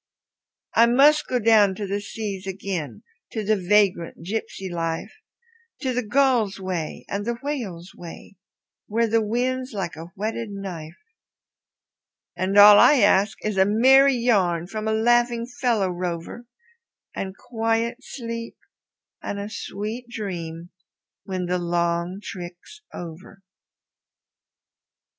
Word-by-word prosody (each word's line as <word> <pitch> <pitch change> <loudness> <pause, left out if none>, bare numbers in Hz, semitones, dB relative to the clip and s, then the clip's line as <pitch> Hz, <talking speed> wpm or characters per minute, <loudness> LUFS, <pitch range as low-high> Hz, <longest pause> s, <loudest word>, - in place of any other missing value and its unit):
I 230 +1 +6
must 285 +5 +5
go 255 - 0
down 215 -4 +4
to 205 - -4
the 200 +1 -2
seas 200 -2 -6
again, 180 - -5 0.3
to 220 - -2
the 215 +2 +2
vagrant 190 -4 +1
gypsy 195 -1 -4
life, 165 +2 -3 0.7
To 260 -3 -1
the 250 - 0
gull's 240 -4 +2
way 180 -5 -4
and 200 +1 -3
the 235 +2 -2
whale's 200 - -5
way, 175 +3 -11 0.5
where 230 +2 +1
the 225 +1 +2
wind's 255 +4 -1
like 190 -4 -4
a 165 +1 -8
whetted 220 +2 -3
knife; 180 -5 -7 1.4
And 185 +3 -1
all 205 0 +10
I 295 - +7
ask 200 0 +3
is 215 -2 -1
a 190 - +6
merry 265 +6 +6
yarn 190 -9 +2
from 215 +3 -5
a - - +1
laughing 240 +1 +2
fellow 240 -5 0
rover, 175 +6 -5 0.7
And 190 0 -5
quiet 225 0 -1
sleep 230 -3 -7 0.6
and 205 - -4
a 200 +1 -5
sweet 220 +4 -5
dream 175 -6 -6 0.5
when 185 -2 -3
the 180 +1 -1
long 170 +1 -1
trick's 180 - -9
over. 175 +3 -10
205 Hz, 125 wpm, -24 LUFS, 180-230 Hz, 1.4 s, all